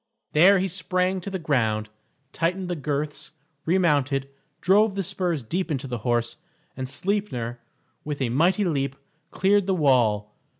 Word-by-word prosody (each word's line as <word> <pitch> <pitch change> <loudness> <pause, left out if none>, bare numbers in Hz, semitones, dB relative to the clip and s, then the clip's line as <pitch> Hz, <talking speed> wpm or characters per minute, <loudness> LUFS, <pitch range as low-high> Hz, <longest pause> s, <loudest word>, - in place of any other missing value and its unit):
There 185 +6 +6
he 190 +1 0
sprang 185 +1 0
to 200 - -6
the 190 - -3
ground, 115 -10 0 0.4
tightened 180 +3 -1
the 175 - -1
girths, 150 0 -4 0.3
remounted, 145 -6 +2 0.3
drove 200 +2 +3
the 195 - -1
spurs 180 -6 -2
deep 180 +11 -2
into 140 -3 -2
the 125 -3 -4
horse, 120 +1 -1 0.4
and 130 0 -4
Sleipner, 140 - -2 0.4
with 150 -1 -4
a 130 -3 0
mighty 175 - +2
leap, 140 -5 -1 0.3
cleared 200 +2 +2
the 190 - +2
wall. 115 - +2
155 Hz, 145 wpm, -25 LUFS, 130-185 Hz, 0.4 s, There